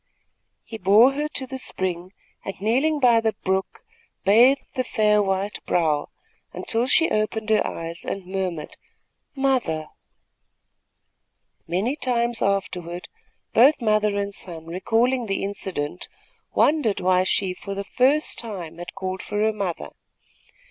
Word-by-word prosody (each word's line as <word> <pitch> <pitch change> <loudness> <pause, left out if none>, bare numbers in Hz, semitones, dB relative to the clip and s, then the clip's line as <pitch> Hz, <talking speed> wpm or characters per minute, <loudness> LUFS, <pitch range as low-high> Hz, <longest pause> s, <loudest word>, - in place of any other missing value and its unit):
He 225 - -8
bore 215 +7 +6
her 295 +2 -2
to 265 - -1
the 260 0 -6
spring 185 -6 -2 0.3
and, 195 - -6
kneeling 265 +9 +1
by 240 -4 +5
the 220 -1 0
brook, 190 - -2 0.4
bathed 240 +7 +4
the 255 - -1
fair 210 -3 +2
white 195 +1 -2
brow, 155 -4 +1 0.4
until 230 +2 -1
she 325 +5 +3
opened 215 +1 -1
her 215 - +4
eyes 165 +1 -5
and 195 -2 -5
murmured: 180 -4 -4 0.6
"Mother!" 250 - 0 1.8
Many 195 - 0
times 240 -4 -1
afterward, 180 -3 -2 0.4
both 270 +7 +6
mother 215 -3 +2
and 200 0 -2
son, 165 -4 -5
recalling 230 +8 0
the 195 - -1
incident, 185 -5 -3 0.5
wondered 290 -10 +3
why 185 0 +3
she, 190 0 0
for 195 +2 -7
the 200 - -3
first 270 +8 +2
time, 180 -8 -6
had 175 - -8
called 190 -1 -4
for 205 - -5
her 220 0 +2
mother. 195 -5 -4
205 Hz, 135 wpm, -23 LUFS, 185-240 Hz, 1.8 s, bore